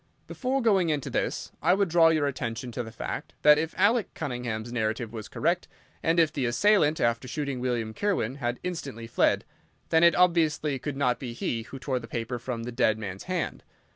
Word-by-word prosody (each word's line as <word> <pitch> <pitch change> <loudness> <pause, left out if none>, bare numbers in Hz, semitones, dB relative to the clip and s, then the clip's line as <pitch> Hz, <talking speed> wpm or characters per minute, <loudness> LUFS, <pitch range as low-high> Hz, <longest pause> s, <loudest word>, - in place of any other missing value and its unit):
"Before 265 0 -2
going 195 -7 +3
into 150 -3 -1
this, - - -2
I - - +4
would 200 0 +2
draw 165 0 +5
your 155 -3 +3
attention 125 -3 -3
to 120 - -3
the 115 -1 -7
fact - - -6
that, 150 0 +7
if 160 +1 -3
Alec 215 -1 +3
Cunningham's 120 -5 -4
narrative 110 0 -2
was 110 -2 -6
correct, - - 0 0.3
and 165 +1 +2
if 160 -2 +3
the 135 -5 0
assailant, 160 - +3
after 115 +2 +1
shooting 140 0 -3
William 120 -3 -1
Kirwan, 140 - -1
had 120 -2 -2
instantly 140 -10 -5
fled, 115 - +2 0.4
then 160 +1 +4
it 170 - +6
obviously 160 -5 +2
could 140 +1 -4
not 125 -3 +1
be 125 -3 -5
he 115 -1 -2
who 120 +4 -9
tore 130 -1 -2
the 115 - -10
paper 120 +1 -3
from 115 -1 -4
the 120 - -5
dead 115 -3 +2
man's 100 -3 -6
hand. 175 - -2
130 Hz, 200 wpm, -27 LUFS, 120-165 Hz, 0.4 s, that